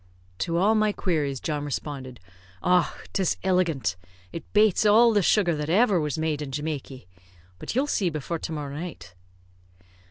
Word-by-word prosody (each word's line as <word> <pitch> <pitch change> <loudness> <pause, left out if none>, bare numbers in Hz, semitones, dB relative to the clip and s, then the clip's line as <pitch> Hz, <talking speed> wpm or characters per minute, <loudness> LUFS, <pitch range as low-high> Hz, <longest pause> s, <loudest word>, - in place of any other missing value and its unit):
To 170 0 -1
all 200 +5 +4
my 215 -1 +2
queries, 150 -9 -1
John 150 +1 -3
responded, 135 -3 -5 0.4
"Och! 180 -1 +1
'tis 190 -4 +1
illigant. 170 - +1 0.3
It 165 - -9
bates 215 -2 +4
all 225 +2 +6
the 205 - +3
sugar 180 -1 +3
that 150 0 -4
ever 200 +1 +4
was 150 -2 -2
made 155 -2 -1
in 145 - -5
Jamaky. 140 - -5 0.5
But - - -5
you'll 265 +3 +2
see 200 -10 0
before 160 +1 -4
to - - -5
morrow 145 -3 -5
night." 145 - -7
165 Hz, 160 wpm, -25 LUFS, 145-195 Hz, 0.5 s, all